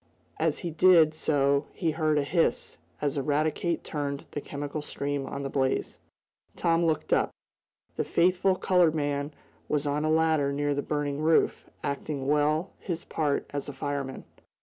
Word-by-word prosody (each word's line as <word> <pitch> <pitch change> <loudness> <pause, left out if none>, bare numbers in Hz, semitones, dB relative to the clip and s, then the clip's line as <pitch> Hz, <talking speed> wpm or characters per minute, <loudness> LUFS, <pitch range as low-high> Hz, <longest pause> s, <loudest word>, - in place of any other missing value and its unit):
As - - +1
he 170 - -2
did 160 -1 +6
so 140 -2 +1
he 165 -4 0
heard 155 -1 +1
a 145 - +2
hiss, 165 - 0 0.2
as 145 -1 0
Eradicate 155 +4 0
turned 140 -2 -4
the 145 - -4
chemical 145 +1 -5
stream 140 -1 -3
on 140 - -5
the - - -2
blaze. 130 -1 -1 0.6
Tom 165 0 +2
looked 160 -2 +1
up. - - +3 0.7
The - - +1
faithful 185 +2 +2
colored 180 -4 +3
man 145 -1 -1 0.4
was 150 -1 0
on 145 +1 0
a 155 - +1
ladder 160 -3 +3
near 145 +1 0
the 145 - -1
burning 145 -1 -2
roof, 160 +1 +2
acting 140 -1 -3
well 150 +5 +1
his 170 -3 -4
part 150 -3 -1
as 145 0 -4
a - - -6
fireman. 140 -1 -4
150 Hz, 160 wpm, -28 LUFS, 140-160 Hz, 0.7 s, did